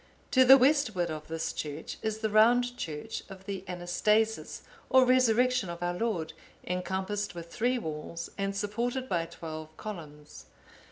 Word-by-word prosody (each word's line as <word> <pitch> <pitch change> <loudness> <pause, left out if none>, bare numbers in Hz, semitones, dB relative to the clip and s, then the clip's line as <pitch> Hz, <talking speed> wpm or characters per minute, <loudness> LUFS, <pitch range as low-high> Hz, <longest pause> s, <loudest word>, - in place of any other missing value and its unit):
To 260 - +6
the 265 +1 +9
westward 250 - +2
of 155 -1 -6
this 165 0 -3
church 150 +1 -6
is 220 0 -3
the 220 - 0
round 245 +3 +4
church 165 0 -5
of 190 -1 -11
the 195 -2 -5
Anastasis 210 +5 0 0.3
or 260 -1 +6
Resurrection 250 -4 +3
of 170 0 -5
our 175 0 0
Lord, 180 -5 -2 0.3
encompassed 190 +2 -2
with 170 0 -9
three 250 +3 +1
walls, 160 -3 -5
and 195 0 -2
supported 235 +5 -2
by 170 -5 -1
twelve 155 -2 -8
columns. 150 -8 -9
195 Hz, 150 wpm, -29 LUFS, 170-235 Hz, 0.3 s, the